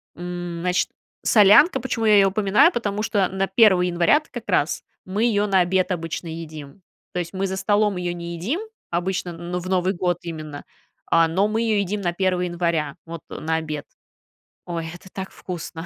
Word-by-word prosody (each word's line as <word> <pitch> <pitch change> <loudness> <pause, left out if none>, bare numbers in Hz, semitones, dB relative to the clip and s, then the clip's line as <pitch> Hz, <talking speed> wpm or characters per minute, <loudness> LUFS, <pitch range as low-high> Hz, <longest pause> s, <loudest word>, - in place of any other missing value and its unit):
м, 175 -1 -5
значит, 180 0 +1 0.3
солянка, 210 - +6
почему 235 -3 -2
я 210 -1 +6
её 195 -1 +5
упоминаю? 210 - +4
Потому 210 -4 -2
что 200 -4 +1
на 190 0 -1
1 190 -3 +5
января-то 175 - +2
как 240 -3 -8
раз 175 -5 +1 0.2
мы 200 +4 -1
её 210 -3 +2
на 195 -2 +3
обед 185 +2 +1
обычно 165 0 -3
едим. 160 +1 -8 0.3
То 180 - -1
есть, 170 +1 -5
мы 195 +1 -1
за 190 0 -3
столом 205 0 +2
её 175 -1 -2
не 170 0 -6
едим 240 - -2 0.3
обычно, 175 0 -2
ну, 175 +2 -4
в 180 - -7
Новый 185 +1 +1
год 175 -1 0
именно, 155 -4 -7 0.4
а, 165 0 +4
но 190 +5 +1
мы 220 +1 -1
её 220 -2 +1
едим 200 +1 -2
на 175 -2 -1
1 180 -1 0
января, 170 -4 -1
вот, 165 -1 -7
э, - - -7
на 160 +1 -1
обед. 155 -2 -4 0.8
Ой, 165 -2 -4
это 180 +2 -13
так 190 0 -6
вкусно. 170 -2 -7
180 Hz, 190 wpm, -23 LUFS, 170-200 Hz, 0.8 s, солянка